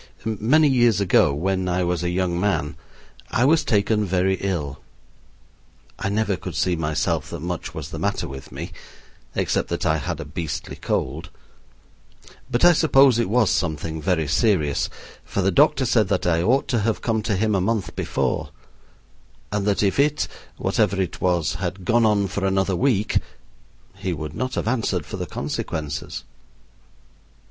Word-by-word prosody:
Many 115 +9 +3
years 120 -6 +4
ago, 95 -7 +4
when 95 +5 -1
I 90 +1 +1
was 90 -1 0
a 90 - 0
young 90 -1 0
man, 90 -6 0 0.5
I 120 - +2
was 160 +3 +4
taken 105 -1 +2
very 95 0 +1
ill 80 -8 -3 1.2
I - - -1
never 105 -1 +1
could 90 -2 -7
see 90 +3 +1
myself 75 -1 -1
that 85 -2 -6
much 85 0 -4
was - - -5
the - - -5
matter - - -1
with 65 0 -9
me, - - -6 0.6
except - - 0
that - - -2
I 80 0 +3
had 75 - -4
a - - -5
beastly 80 -4 -5
cold. 70 +6 -2 1.2
But 120 +5 +2
I 175 - +8
suppose 135 -6 +5
it 115 - 0
was 110 -2 +3
something 80 -1 -2
very 80 -1 +1
serious, 75 - +1 0.3
for - - -2
the - - +3
doctor - - +4
said - - +3
that - - 0
I 85 -1 +2
ought 125 +9 +2
to 120 - +2
have 110 +1 0
come 110 -2 +1
to 105 -1 -1
him 105 +3 +1
a 95 - +2
month 110 +1 -1
before, - - -1 1.0
and 105 0 -1
that 100 0 +2
if 100 +5 +1
it 150 +1 +2 0.3
(whatever 100 - +1
it 95 -4 -2
was) 85 -4 +1
had 90 0 -4
gone 115 +3 +4
on 100 -2 +2
for 100 +1 -4
another 95 0 +1
week 110 -1 +2 0.8
he - - -2
would 75 -1 -5
not 130 +8 -3
have - - -2
answered 115 -2 0
for - - -6
the - - -4
consequences. 75 -2 -4
95 Hz, 170 wpm, -23 LUFS, 85-110 Hz, 1.2 s, I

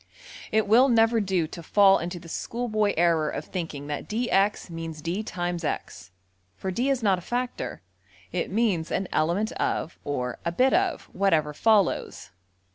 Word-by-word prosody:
} - - -13
It 220 0 +2
will 245 +6 +6
never 225 -1 +4
do 185 -4 0
to 165 +2 -8
fall 195 +3 +5
into 175 +1 -5
the 170 - -13
schoolboy 215 +2 -1
error 165 -3 +3
of - - -5
thinking 160 -6 -5
that 145 -1 -5
$dx$ 210 -3 +1
means 165 -1 -6
$d$~times~$x$, 175 - -3 0.5
for 190 - -4
$d$ 245 +8 0
is 265 -4 0
not 195 -3 +3
a - - -11
factor 245 +6 -4 0.5
it - - -2
means 195 -6 0
``an 190 - -1
element 175 +8 +1
of'' 165 - -2
or 125 -4 -3
``a 170 0 -3
bit 260 +1 +4
of'' 370 -3 +1
whatever 160 -6 +2
follows. 210 +2 +1
190 Hz, 160 wpm, -26 LUFS, 165-220 Hz, 0.5 s, will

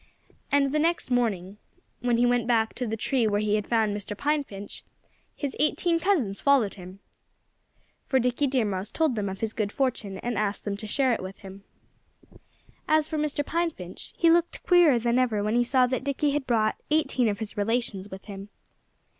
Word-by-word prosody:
And 280 -1 +3
the 305 - +1
next 335 -3 0
morning, 205 -6 0 0.4
when 240 0 +1
he 240 - +3
went 245 -1 +2
back 225 -2 +2
to 250 - -4
the 220 +1 -3
tree 240 0 +1
where 205 -1 +1
he 210 0 0
had 210 -1 0
found 220 -3 +1
Mr. 205 0 -6
Pine 295 +2 +1
Finch, 200 -5 -9 0.5
his 285 -3 -4
eighteen 335 +3 +2
cousins 305 - 0
followed 270 -8 +3
him. 185 0 -11 1.1
For 265 - +2
Dickie 250 +3 +1
Deer 255 -4 +1
Mouse 195 0 -3
told 320 -5 +1
them 205 -2 -2
of 190 0 -7
his 220 -1 -2
good 210 -2 -2
fortune 225 -8 -2
and 240 -3 -1
asked 210 -1 -2
them 205 -1 -2
to 215 +1 -7
share 260 +3 +2
it - - -2
with 190 +1 -7
him. 195 0 -12 1.2
As 310 -1 +3
for 315 -1 -3
Mr. 295 -1 -1
Pine 340 +2 0
Finch, 180 - -10
he 335 -1 +5
looked 340 0 +1
queerer 345 -8 +6
than 235 +1 +1
ever 225 -5 +1
when 215 +1 0
he 240 +1 +3
saw 255 +1 +3
that 255 0 -2
Dickie 280 +1 0
had 285 -2 -2
brought 220 -3 +1
eighteen 300 -6 +2
of 205 - -2
his 215 0 -6
relations 205 -2 -1
with 190 0 -10
him. 200 -1 -8
235 Hz, 200 wpm, -26 LUFS, 205-280 Hz, 1.2 s, queerer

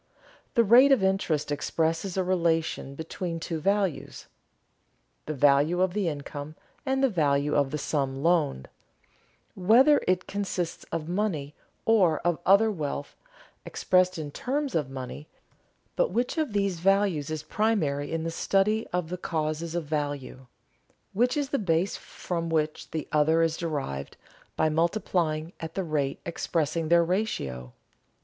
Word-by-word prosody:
_ - - -43
The 235 - +5
rate 245 +6 +7
of 255 -8 +4
interest 170 -6 0
expresses 165 +5 -1
a 190 - +2
relation 165 -6 0
between 165 +2 -5
two 165 0 -4
values, 195 0 -1 1.0
the 155 - -2
value 145 +5 +3
of 185 -1 +2
the 205 -3 0
income 145 0 -5 0.3
and 265 0 +1
the - - +6
value 150 - +1
of 140 -2 +2
the 150 - -3
sum 135 -2 -2
loaned, 160 - +1 0.9
whether 245 +11 +5
it 185 0 +1
consists 190 -4 -3
of 160 -2 -4
money 170 -6 -2 0.3
or 190 -8 +4
of 175 -1 0
other 210 +3 +6
wealth 145 -5 -4 0.5
expressed 185 0 +1
in 150 -2 -5
terms 275 - -2
of 150 -5 0
money; 135 +3 -7 0.7
But - - +2
which 245 +1 -1
of 300 -9 -1
these 200 -4 0
values 195 -5 +2
is 155 -1 -4
primary 155 -7 0
in 165 0 -2
a 165 - -2
study 205 +6 +1
of 180 -2 -2
the 180 - -4
causes 160 0 -2
of 170 -2 -2
value? 145 -3 -4 0.7
Which 245 +6 +2
is 285 -2 -1
the 280 - 0
base 180 -1 +1
from 170 -2 -5
which 155 -1 -1
the 160 -2 -4
other 155 +2 +3
is 165 -1 +1
derived 140 - -4 0.4
by 160 - +2
multiplying 165 -1 0
at 160 -1 -7
the 195 - -1
rate 150 -4 -1
expressing 165 -1 -1
their 170 0 +5
ratio? 70 - -2
165 Hz, 150 wpm, -27 LUFS, 150-195 Hz, 1.0 s, rate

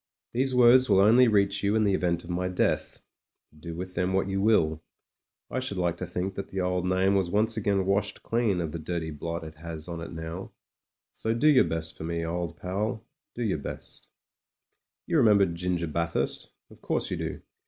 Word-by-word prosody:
These 130 +2 0
words 125 +1 +6
will 95 - +5
only 115 +6 +6
reach 100 -2 +2
you 100 +1 +1
in 110 - +3
the 100 -2 +2
event 85 -2 0
of 90 - -7
my 90 +1 -1
death; 90 - 0 0.5
do 80 +2 -8
with 90 +2 -5
them 90 +1 0
what 95 0 +1
you 95 0 -1
will. 80 -8 +3 0.7
I - - -1
should 130 -7 -3
like 85 -2 0
to 90 - -5
think 90 +2 -3
that 100 +1 -5
the 95 - -5
old 90 0 0
name 95 +1 +2
was 95 -3 +1
once 110 +4 +1
again 100 -3 +1
washed 100 +1 0
clean 115 -5 +1
of 80 -2 -3
the 85 - -5
dirty 80 0 -3
blot 85 +3 -5
it 80 0 -10
has 80 0 -7
on 85 -1 -5
it 85 - -7
now; 80 +3 -7 0.6
so 110 +1 -2
do 120 - 0
your 145 -4 +6
best 80 0 -2
for - - -8
me, 85 0 -2
old 85 -1 -3
pal, 105 +8 -3 0.3
do 120 - -3
your 95 -8 0
best. - - -8 1.0
You 165 - +1
remember 105 -7 +5
Ginger 85 0 -2
Bathurst— 85 +1 -1 0.2
of - - -17
course - - -1
you - - -1
do. - - -4
90 Hz, 205 wpm, -27 LUFS, 85-105 Hz, 1.0 s, words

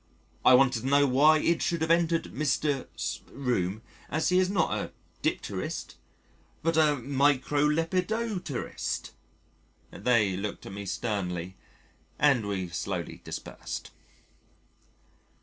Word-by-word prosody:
I 130 - +8
wanted 130 -2 +4
to 130 - -4
know 140 +1 +5
why 145 +4 +5
it 165 +2 +1
should 170 -2 0
have 160 +1 +1
entered 165 -1 +3
Mr. 145 -1 0
's - - -3
room 110 -6 -1 0.3
as 155 +2 +1
he 180 0 +4
is 185 0 +2
not 190 -5 +1
a - - -3 0.3
dipterist - - -3 0.7
but 165 0 +1
a 155 -2 +4
microlepidopterist. 150 - 0 0.8
They 105 -2 +2
looked 100 +2 -5
at - - -8
me 100 0 -6
sternly 95 -5 -3 0.6
and 135 -8 +3
we 95 -3 -2
slowly 90 0 -4
dispersed. - - -6
140 Hz, 115 wpm, -28 LUFS, 105-160 Hz, 0.8 s, I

